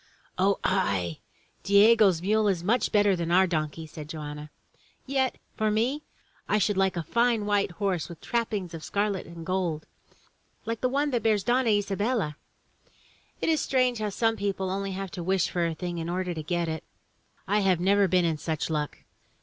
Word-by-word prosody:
"O 195 Hz, +1 st, +3 dB
aye! 100 Hz, -, 0 dB, 0.4 s
Diego's 200 Hz, -2 st, +5 dB
mule 215 Hz, +2 st, +2 dB
is 180 Hz, -4 st, 0 dB, 0.3 s
better 205 Hz, -2 st, +3 dB
than 170 Hz, -1 st, -3 dB
our 185 Hz, +2 st, +5 dB
donkey," 160 Hz, -2 st, -2 dB
said 155 Hz, -1 st, -9 dB
Joanna. 150 Hz, -1 st, -6 dB, 0.6 s
"Yet, 265 Hz, -1 st, 0 dB, 0.2 s
for 215 Hz, -1 st, +1 dB
me, 240 Hz, +8 st, 0 dB, 0.5 s
I 210 Hz, -, +3 dB
should 205 Hz, 0 st, +1 dB
Uke 190 Hz, -1 st, +1 dB
a 170 Hz, -, -1 dB
fine 235 Hz, +3 st, +1 dB
white 205 Hz, -1 st, +1 dB
horse 190 Hz, -4 st, -1 dB
with 170 Hz, -2 st, -9 dB
trappings 210 Hz, -7 st, -2 dB
of 160 Hz, -1 st, -7 dB
scarlet 200 Hz, -2 st, -1 dB
and 170 Hz, -1 st, -9 dB
gold, 175 Hz, -4 st, -1 dB, 0.8 s
like 230 Hz, 0 st, -3 dB
the 255 Hz, -, +2 dB
one 285 Hz, +2 st, 0 dB
that 240 Hz, -2 st, 0 dB
bears 215 Hz, -3 st, +2 dB
Donna 245 Hz, +2 st, +2 dB
Isa 205 Hz, -2 st, +1 dB
bella. 205 Hz, -8 st, 0 dB, 1.1 s
It -, -, +1 dB
is 315 Hz, -2 st, +2 dB
strange 255 Hz, -3 st, +1 dB
how 215 Hz, -1 st, -1 dB
some 225 Hz, +2 st, 0 dB
people 195 Hz, -2 st, -2 dB
have 190 Hz, -, -1 dB
only 195 Hz, -1 st, -4 dB
to 175 Hz, -, -6 dB
wish 190 Hz, +1 st, +1 dB
for 175 Hz, -1 st, +1 dB
a 165 Hz, -, -3 dB
thing 175 Hz, +1 st, -4 dB
in 165 Hz, +1 st, -4 dB
order 180 Hz, 0 st, -2 dB
to 160 Hz, -, -5 dB
get 170 Hz, +2 st, -1 dB
it. 160 Hz, -1 st, -4 dB, 0.6 s
I 205 Hz, +2 st, +2 dB
have 190 Hz, -4 st, +2 dB
never 200 Hz, +2 st, +3 dB
been 180 Hz, -1 st, +3 dB
in 160 Hz, -2 st, 0 dB
such 160 Hz, +1 st, -2 dB
luck. 150 Hz, -2 st, -3 dB
190 Hz, 185 wpm, -27 LUFS, 170-215 Hz, 1.1 s, Diego's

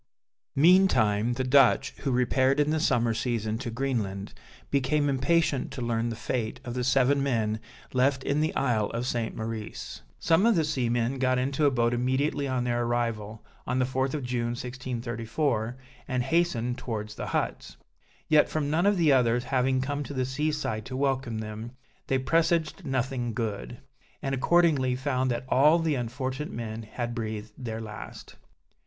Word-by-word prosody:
Meantime 135 Hz, -, +4 dB
the 130 Hz, +2 st, -2 dB
Dutch, 135 Hz, +1 st, +4 dB
who 140 Hz, -, -1 dB
repaired 130 Hz, +2 st, +2 dB
in 150 Hz, +1 st, +2 dB
the 160 Hz, -, +1 dB
summer 120 Hz, -7 st, +2 dB
season 110 Hz, -1 st, -2 dB
to 130 Hz, -2 st, -4 dB
Greenland, 115 Hz, -6 st, -2 dB, 0.4 s
became 140 Hz, +2 st, +2 dB
impatient 140 Hz, +1 st, +1 dB
to 125 Hz, -, -7 dB
learn 115 Hz, 0 st, 0 dB
the 115 Hz, -, -4 dB
fate 115 Hz, 0 st, -3 dB
of 120 Hz, -, -4 dB
the 125 Hz, 0 st, -2 dB
seven 135 Hz, +2 st, +3 dB
men 110 Hz, -5 st, 0 dB, 0.3 s
left 130 Hz, +1 st, +2 dB
in 145 Hz, +2 st, +1 dB
the 155 Hz, -, 0 dB
Isle 115 Hz, -6 st, +1 dB
of 120 Hz, +1 st, -2 dB
St. 120 Hz, -3 st, -2 dB
Maurice. 110 Hz, -, -6 dB, 0.2 s
Some 170 Hz, +6 st, +3 dB
of 230 Hz, -, +4 dB
the 165 Hz, -, +3 dB
seamen 120 Hz, -2 st, 0 dB
got 130 Hz, -1 st, +2 dB
into 140 Hz, +3 st, +1 dB
a -, -, +6 dB
boat 120 Hz, -2 st, +1 dB
immediately 130 Hz, +4 st, 0 dB
on 130 Hz, -2 st, 0 dB
their 120 Hz, -1 st, 0 dB
arrival, 115 Hz, -3 st, -2 dB, 0.2 s
on 125 Hz, -, 0 dB
the 130 Hz, -, +2 dB
4th 130 Hz, +2 st, -1 dB
of 145 Hz, -, -3 dB
June 120 Hz, -1 st, -1 dB
1634, 120 Hz, 0 st, -3 dB, 0.3 s
and 125 Hz, -1 st, 0 dB
hastened 135 Hz, -5 st, 0 dB
towards 110 Hz, -3 st, -4 dB
the -, -, -6 dB
huts. -, -, -3 dB, 0.5 s
Yet, 155 Hz, -1 st, +5 dB
from 150 Hz, -2 st, -1 dB
none 170 Hz, +5 st, +2 dB
of 205 Hz, -1 st, +3 dB
the 165 Hz, -4 st, +4 dB
others 120 Hz, -2 st, +3 dB
having 130 Hz, 0 st, +1 dB
come 145 Hz, +2 st, -2 dB
to 145 Hz, -, -7 dB
the 130 Hz, -1 st, 0 dB
sea 150 Hz, +4 st, -1 dB
side 115 Hz, -8 st, -3 dB
to 130 Hz, -, -5 dB
welcome 130 Hz, -4 st, 0 dB
them, 110 Hz, +2 st, -6 dB, 0.3 s
they 135 Hz, -, +2 dB
presaged 165 Hz, +4 st, +1 dB
nothing 125 Hz, -3 st, -1 dB
good; 105 Hz, -, -3 dB, 0.4 s
and 135 Hz, -, -3 dB
accordingly 140 Hz, -3 st, +3 dB
found 130 Hz, -1 st, 0 dB
that 120 Hz, +1 st, -2 dB
all 150 Hz, +6 st, +5 dB
the 165 Hz, -2 st, 0 dB
unfortunate 130 Hz, +3 st, -3 dB
men 115 Hz, -1 st, -5 dB
had 120 Hz, +2 st, -5 dB
breathed 110 Hz, -2 st, -5 dB
their 115 Hz, -3 st, -5 dB
last. 110 Hz, -1 st, -9 dB
125 Hz, 170 wpm, -27 LUFS, 115-140 Hz, 0.5 s, a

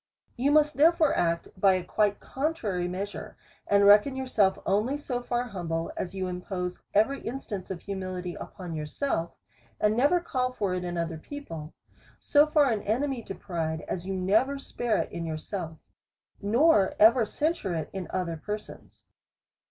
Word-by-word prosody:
You 265 Hz, +4 st, +1 dB
must 300 Hz, 0 st, +4 dB
therefore 320 Hz, +1 st, +5 dB
act 170 Hz, -1 st, 0 dB
by 190 Hz, 0 st, +4 dB
a 185 Hz, -1 st, -1 dB
quite 205 Hz, +3 st, +1 dB
contrary 240 Hz, -, -2 dB
mea 185 Hz, +3 st, -2 dB
sure, 205 Hz, -, -9 dB, 0.3 s
and 200 Hz, 0 st, +4 dB
reckon 210 Hz, +7 st, +6 dB
yourself 225 Hz, -7 st, +2 dB
only 215 Hz, +9 st, +1 dB
so 250 Hz, -4 st, -3 dB
far 245 Hz, 0 st, -1 dB
humble, 170 Hz, -7 st, -3 dB
as 185 Hz, +1 st, -4 dB
you 190 Hz, -1 st, -2 dB
impose 180 Hz, 0 st, -4 dB
every 220 Hz, +7 st, +3 dB
instance 225 Hz, -6 st, -5 dB
of 185 Hz, -3 st, -5 dB
humility 185 Hz, -2 st, -4 dB
upon 180 Hz, -1 st, -8 dB
yourself, 165 Hz, -, -2 dB, 0.4 s
and 210 Hz, 0 st, +3 dB
never 285 Hz, +9 st, +4 dB
call 255 Hz, -7 st, -1 dB
for 200 Hz, -6 st, -1 dB
it 180 Hz, 0 st, -2 dB
in 175 Hz, -1 st, -3 dB
other 165 Hz, -1 st, -2 dB
people. 165 Hz, -, -8 dB, 0.4 s
So 295 Hz, +1 st, +4 dB
far 295 Hz, -4 st, +4 dB
an 215 Hz, -2 st, 0 dB
enemy 255 Hz, +4 st, -1 dB
to 195 Hz, -, -7 dB
pride, 160 Hz, -3 st, -3 dB
as 180 Hz, 0 st, -4 dB
you 195 Hz, -, -2 dB
never 220 Hz, +10 st, +2 dB
spare 240 Hz, -4 st, -1 dB
it -, -, -2 dB
in 170 Hz, -, -4 dB
yourself, 160 Hz, +1 st, -5 dB, 0.6 s
nor 215 Hz, 0 st, +4 dB
even 225 Hz, +2 st, +7 dB
cen 310 Hz, +9 st, 0 dB
sure 190 Hz, -, -4 dB
it 160 Hz, -2 st, -4 dB
in 190 Hz, -3 st, -4 dB
other 175 Hz, -3 st, -2 dB
persons. 210 Hz, 0 st, -7 dB
200 Hz, 165 wpm, -28 LUFS, 180-255 Hz, 0.6 s, even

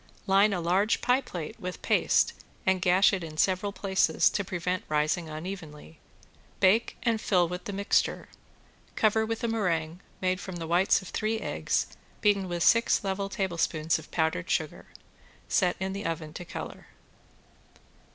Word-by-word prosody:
Line 200 Hz, +1 st, +4 dB
a 190 Hz, -, -1 dB
large 185 Hz, +6 st, +2 dB
pie 250 Hz, +2 st, +2 dB
plate 180 Hz, -, -7 dB
with 180 Hz, -3 st, -6 dB
paste -, -, +3 dB, 0.3 s
and 190 Hz, -1 st, +2 dB
gash 185 Hz, +3 st, +4 dB
it 190 Hz, -3 st, -2 dB
in 155 Hz, -1 st, -8 dB
several 190 Hz, +4 st, +1 dB
places 190 Hz, -5 st, +2 dB
to 200 Hz, -, -1 dB
prevent 180 Hz, 0 st, -2 dB
rising 155 Hz, +2 st, 0 dB
unevenly, 155 Hz, -, -8 dB, 0.6 s
bake 205 Hz, +5 st, +3 dB
and 230 Hz, -2 st, +1 dB
fill 180 Hz, -3 st, +2 dB
with 180 Hz, +1 st, -6 dB
the -, -, -4 dB
mixture. 200 Hz, 0 st, 0 dB, 0.7 s
Cover 220 Hz, 0 st, +2 dB
with 225 Hz, +2 st, -3 dB
a -, -, +1 dB
meringue 175 Hz, -7 st, -1 dB, 0.2 s
made 185 Hz, 0 st, 0 dB
from 185 Hz, 0 st, -7 dB
the 170 Hz, -1 st, -5 dB
white 180 Hz, +4 st, +3 dB
of 185 Hz, -, -9 dB
three 220 Hz, +1 st, -1 dB
eggs -, -, -1 dB, 0.3 s
beaten 200 Hz, -2 st, +2 dB
with 175 Hz, -1 st, -1 dB
six 230 Hz, -2 st, +4 dB
level 195 Hz, 0 st, -2 dB
tablespoons 165 Hz, -5 st, 0 dB
of 160 Hz, -, -13 dB
powdered 160 Hz, -, -1 dB
sugar. -, -, -2 dB, 0.6 s
Set 180 Hz, -1 st, +2 dB
in 190 Hz, +1 st, -2 dB
the 200 Hz, +1 st, -5 dB
oven 155 Hz, -2 st, -4 dB
to 180 Hz, -, -7 dB
color. -, -, -8 dB
185 Hz, 160 wpm, -28 LUFS, 165-200 Hz, 0.7 s, Line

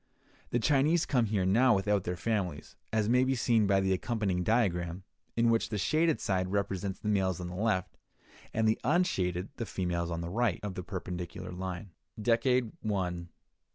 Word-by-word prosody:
The -, -, +1 dB
Chinese 150 Hz, +6 st, +3 dB
come 125 Hz, -5 st, +2 dB
here 100 Hz, -3 st, 0 dB
now 115 Hz, +5 st, +5 dB
without 100 Hz, 0 st, +1 dB
their 90 Hz, -, -1 dB
families, 90 Hz, -6 st, -2 dB, 0.2 s
as 110 Hz, -1 st, +1 dB
may 125 Hz, +3 st, +4 dB
be 130 Hz, +1 st, +1 dB
seen 115 Hz, -3 st, +3 dB
by 95 Hz, 0 st, +4 dB
the 95 Hz, 0 st, +2 dB
accompanying 95 Hz, -3 st, -1 dB
diagram, 90 Hz, -5 st, 0 dB, 0.3 s
in 115 Hz, 0 st, +4 dB
which 115 Hz, -, +1 dB
the 105 Hz, -, -2 dB
shaded 155 Hz, -, +2 dB
side 95 Hz, -1 st, 0 dB
represents 100 Hz, -1 st, -1 dB
the -, -, -6 dB
males 95 Hz, -4 st, +1 dB
on 90 Hz, -1 st, -5 dB
the -, -, -7 dB
left, 100 Hz, -2 st, -1 dB, 0.5 s
and 110 Hz, 0 st, +1 dB
the 110 Hz, -, +2 dB
unshaded 95 Hz, -, +1 dB
the 115 Hz, -, -3 dB
females 90 Hz, -2 st, -2 dB
on 85 Hz, 0 st, -3 dB
the 85 Hz, -, -4 dB
right, 115 Hz, -2 st, +1 dB
of 105 Hz, -2 st, -3 dB
the 90 Hz, -, -5 dB
perpendicular 90 Hz, -2 st, -6 dB
line. 90 Hz, +1 st, -5 dB, 0.3 s
Decade. 120 Hz, +1 st, +2 dB
100 Hz, 175 wpm, -30 LUFS, 90-115 Hz, 0.5 s, now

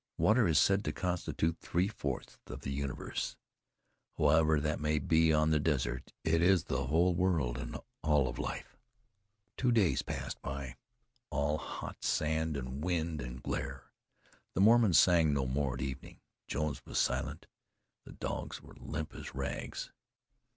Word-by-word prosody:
Water 110 Hz, 0 st, +4 dB
is 80 Hz, -3 st, +3 dB
said 100 Hz, +5 st, +4 dB
to -, -, 0 dB
constitute 85 Hz, -2 st, -1 dB
three 90 Hz, +3 st, 0 dB
fourths 70 Hz, -, -5 dB
of -, -, -7 dB
the 65 Hz, -, -4 dB
universe. 70 Hz, -1 st, -3 dB, 0.8 s
However 80 Hz, +1 st, +4 dB
that 75 Hz, +1 st, -1 dB
may 75 Hz, 0 st, +1 dB
be, 80 Hz, +2 st, +3 dB
on 75 Hz, 0 st, +3 dB
the 75 Hz, -, +4 dB
desert 65 Hz, -6 st, -1 dB
it 80 Hz, +1 st, +2 dB
is 90 Hz, -1 st, +5 dB
the 65 Hz, 0 st, -2 dB
whole 85 Hz, +5 st, +3 dB
world, 85 Hz, -9 st, +1 dB
and -, -, -5 dB, 0.2 s
all 75 Hz, -4 st, +3 dB
of 65 Hz, +1 st, -5 dB
life. -, -, -5 dB, 0.8 s
Two 125 Hz, -1 st, +2 dB
days 110 Hz, -7 st, +3 dB
passed -, -, -5 dB
by, 65 Hz, -2 st, -5 dB, 0.5 s
all 75 Hz, +1 st, 0 dB
hot -, -, -7 dB
sand 80 Hz, 0 st, 0 dB
and 65 Hz, +2 st, -5 dB
wind 85 Hz, -3 st, -1 dB
and 60 Hz, 0 st, -7 dB
glare. -, -, -4 dB, 0.6 s
The 95 Hz, -, +2 dB
Mormons 110 Hz, -4 st, +6 dB
sang 80 Hz, -5 st, +5 dB
no 70 Hz, -2 st, +1 dB
more 65 Hz, 0 st, 0 dB
at 65 Hz, -, -6 dB
evening; 65 Hz, -1 st, -6 dB, 0.3 s
Jones 75 Hz, 0 st, -2 dB
was -, -, -5 dB
silent; 65 Hz, +1 st, 0 dB, 0.6 s
the -, -, -11 dB
dogs -, -, -4 dB
were -, -, -15 dB
limp 80 Hz, 0 st, -5 dB
as -, -, -8 dB
rags. -, -, -4 dB
75 Hz, 155 wpm, -33 LUFS, 70-85 Hz, 0.8 s, Mormons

